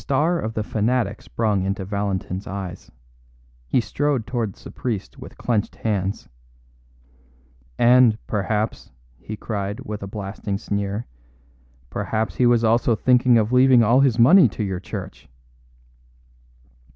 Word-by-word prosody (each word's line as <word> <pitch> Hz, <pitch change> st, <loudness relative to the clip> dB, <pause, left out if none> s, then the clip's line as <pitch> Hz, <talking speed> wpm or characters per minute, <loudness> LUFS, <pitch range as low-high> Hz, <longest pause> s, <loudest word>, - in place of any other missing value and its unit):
The -, -, -16 dB
star 155 Hz, +6 st, +1 dB
of 110 Hz, -5 st, -4 dB
the 110 Hz, -, -1 dB
fanatic 110 Hz, -1 st, -1 dB
sprang 105 Hz, -4 st, -1 dB
into 95 Hz, 0 st, -2 dB
Valentin's 100 Hz, -1 st, -3 dB
eyes; 95 Hz, -2 st, -6 dB, 0.8 s
he 65 Hz, -, +2 dB
strode 135 Hz, -1 st, -1 dB
towards 115 Hz, -4 st, -4 dB
the -, -, -9 dB
priest 110 Hz, -6 st, -5 dB
with -, -, -11 dB
clenched 110 Hz, -4 st, -1 dB
hands. 100 Hz, -3 st, -2 dB, 1.5 s
"And, 120 Hz, -2 st, +5 dB
perhaps," 105 Hz, +1 st, -2 dB, 0.3 s
he 110 Hz, +9 st, -7 dB
cried, 100 Hz, -2 st, -4 dB
with 105 Hz, -1 st, -6 dB
a 100 Hz, -, -5 dB
blasting 100 Hz, 0 st, -5 dB
sneer, 100 Hz, +1 st, -3 dB, 0.9 s
"perhaps 110 Hz, -5 st, -2 dB
he 125 Hz, -, +4 dB
was 120 Hz, -1 st, +3 dB
also 115 Hz, +1 st, +3 dB
thinking 125 Hz, +1 st, +4 dB
of 110 Hz, +1 st, +1 dB
leaving 125 Hz, -1 st, +6 dB
all 120 Hz, +4 st, +4 dB
his 135 Hz, -4 st, +3 dB
money 130 Hz, +4 st, +7 dB
to 105 Hz, -, -4 dB
your 95 Hz, -3 st, -3 dB
church." 95 Hz, -, -8 dB
110 Hz, 135 wpm, -22 LUFS, 100-120 Hz, 1.5 s, money